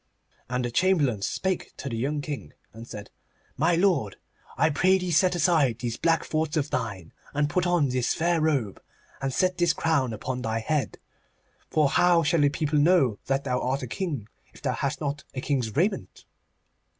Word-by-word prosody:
And 125 0 -1
the 120 - -3
Chamberlain 145 - +2
spake 190 - -2
to - - -6
the 120 - -3
young 145 +6 -1
King, 145 -1 -6 0.2
and 115 +1 -10
said, 105 -3 -9 0.4
'My 165 +5 +2
lord, 170 - +2 0.4
I 155 - +3
pray 185 +6 +4
thee 180 -1 -3
set 180 +3 +3
aside 155 - +3
these 120 -2 -3
black 165 -1 +1
thoughts 155 0 -1
of 150 0 -1
thine, 100 -9 -4 0.2
and 145 0 +1
put 180 -1 +1
on 175 -6 +2
this 125 -1 0
fair 170 0 +1
robe, 135 -11 0 0.4
and 135 0 -1
set 185 +6 0
this 175 -1 +3
crown 150 -8 +1
upon 125 +4 -4
thy 110 -2 -1
head. 130 +2 -1 0.7
For 155 -2 +3
how 175 +3 +4
shall 160 +1 +2
the 145 - +5
people 150 0 0
know 145 - +3
that 135 +1 0
thou 125 -2 -1
art 135 +2 -1
a - - -4
king, 145 - -4 0.2
if - - -18
thou 130 -3 0
hast 140 +5 -2
not 145 -1 -3
a - - -2
king's 130 -6 -1
raiment? 190 +7 -1
145 Hz, 185 wpm, -26 LUFS, 125-170 Hz, 0.7 s, the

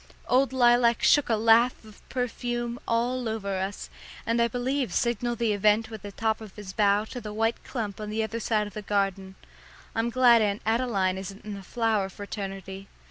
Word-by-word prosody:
Old 260 +2 +3
Lilac 240 -2 +4
shook 290 -3 +4
a 225 - +3
laugh 225 +2 +4
of 215 -2 -15
perfume 240 -1 -3
all 240 +1 0
over 200 -3 -3
us, 195 +2 -4 0.4
and 230 +1 +1
I 235 - +4
believe 250 0 -1
signalled 240 0 0
the 225 -2 +1
event 210 +2 +2
with 220 -2 -7
the 205 - -8
top 220 +2 -1
of 215 -3 -11
his 200 -3 -8
bough 205 0 +3
to 245 - -6
the 210 -1 -6
white 225 +2 -1
clump 215 -5 -5
on 210 - -5
the 220 +1 -1
other 225 +1 -3
side 215 -1 0
of 205 - -9
the 215 - -5
garden. 195 -2 -1 0.6
I'm 225 +1 0
glad 240 -1 +5
Aunt 205 -1 0
Adeline 215 -5 +1
isn't 195 +2 -9
in 210 - -5
the 200 - -7
flower 215 -1 0
fraternity. 195 -1 -7
220 Hz, 190 wpm, -27 LUFS, 200-235 Hz, 0.6 s, glad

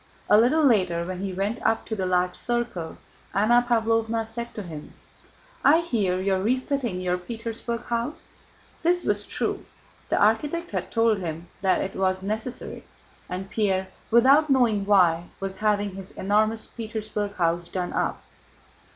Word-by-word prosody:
A - - +9
little 285 +8 +4
later 185 -10 +3
when 185 0 -5
he 195 0 -3
went 200 +6 -2
up 225 0 +1
to 220 - -3
the 190 -3 -2
large 180 0 +1
circle, 240 -9 -3 0.4
Anna 235 +5 +4
Pávlovna 225 -1 +1
said 235 +1 -6
to 210 - -5
him: 155 -4 -9 0.7
"I 315 +4 +6
hear 205 - 0
you 195 +1 +1
are 190 - 0
refitting 250 -3 -1
your 180 0 0
Petersburg 230 +3 -5
house?" 235 +5 -3 0.5
This 355 +1 +3
was - - +1
true. - - -2 0.5
The - - +2
architect 295 +11 +1
had 185 -3 -3
told 225 -2 +2
him 165 -1 -5
that 190 -1 +2
it 195 - -4
was 190 0 0
necessary, 220 +5 -4 0.5
and 190 +2 -5
Pierre, 190 -3 0 0.2
without 270 +6 +5
knowing 230 -7 +3
why, 175 -4 +4
was 195 -1 -4
having 205 -1 +1
his 195 0 -4
enormous 215 +3 +1
Petersburg 215 -2 -4
house 170 0 0
done 180 -1 -3
up. - - -1
210 Hz, 155 wpm, -25 LUFS, 185-235 Hz, 0.7 s, A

